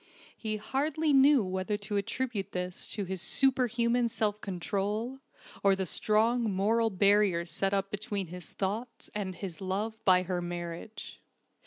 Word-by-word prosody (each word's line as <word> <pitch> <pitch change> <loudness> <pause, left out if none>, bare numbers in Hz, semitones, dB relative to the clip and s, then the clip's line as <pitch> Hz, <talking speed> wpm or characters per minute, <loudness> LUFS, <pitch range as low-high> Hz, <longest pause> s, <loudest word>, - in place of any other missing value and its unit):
He 215 -1 -3
hardly 290 +7 0
knew 275 -2 +6
whether 190 +2 -2
to 205 0 -5
attribute 200 -1 -2
this 180 0 -4
to 205 -2 -3
his 185 -1 -4
superhuman 245 -2 +3
self 210 -2 -1
control, 205 +7 -2 0.4
or 195 -1 +5
the 190 0 -1
strong 220 +5 +2
moral 220 +4 +2
barrier 200 -3 +3
set 195 +2 -1
up 195 0 0
between 205 -2 -3
his 175 0 -9
thoughts 220 +5 -4
and 195 -3 -3
his 180 -3 -7
love 205 +4 -3
by 185 -1 +5
her 180 -1 -2
marriage. 175 +4 -6
205 Hz, 145 wpm, -30 LUFS, 190-230 Hz, 0.4 s, knew